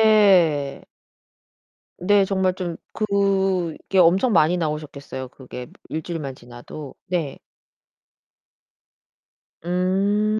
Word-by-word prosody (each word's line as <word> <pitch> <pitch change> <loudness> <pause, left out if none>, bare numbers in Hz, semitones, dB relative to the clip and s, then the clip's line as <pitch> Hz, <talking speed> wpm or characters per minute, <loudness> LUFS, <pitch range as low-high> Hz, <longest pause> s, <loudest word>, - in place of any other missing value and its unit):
네. 185 -10 +4 1.2
네. 200 +2 +4
정말 190 -1 +1
좀 175 -3 -4 0.2
그게 195 -4 0
엄청 190 +7 +4
많이 170 +1 +4
나오셨겠어요. 150 -5 -4
그게 125 -1 -9 0.2
일주일만 155 -4 -4
지나도. 120 +4 -10
네. 170 -6 -2 2.3
음. 195 +4 +1
180 Hz, 160 characters per minute, -23 LUFS, 150-195 Hz, 2.3 s, 네